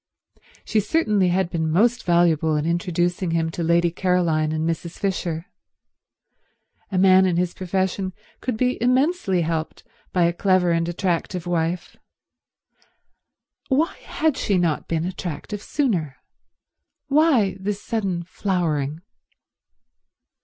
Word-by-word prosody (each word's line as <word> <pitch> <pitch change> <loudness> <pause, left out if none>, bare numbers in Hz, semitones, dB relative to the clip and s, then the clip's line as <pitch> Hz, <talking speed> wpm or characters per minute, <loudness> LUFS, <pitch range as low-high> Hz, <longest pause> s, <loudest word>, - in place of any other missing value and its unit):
She 220 - +1
certainly 210 - +2
had 180 0 +1
been 160 -1 -1
most 235 +9 +2
valuable 165 -3 +3
in 150 0 0
introducing 175 +1 0
him 165 -1 0
to 170 - -5
Lady 170 +1 +2
Caroline 170 -4 +1
and 160 +1 -1
Mrs. 165 +1 -4
Fisher. 175 -4 -2 1.5
A 190 - -1
man 190 0 +6
in 175 -2 0
his 175 0 0
profession 190 +1 -2 0.3
could 250 -4 -3
be 250 +1 0
immensely 255 - +2
helped 160 -1 -3 0.3
by 180 - +2
a 170 0 +2
clever 185 -1 +2
and 165 0 +1
attractive 180 0 -2
wife. 175 0 -2 1.7
Why 295 +5 +1
had 315 -3 -1
she 200 -3 +1
not 170 -4 0
been 165 0 -1
attractive 185 +2 -5
sooner? 180 - -1 0.9
Why 275 - +3
this 200 +1 -3
sudden 195 -8 -2
flowering? 165 -5 -2
180 Hz, 120 wpm, -23 LUFS, 165-200 Hz, 1.7 s, man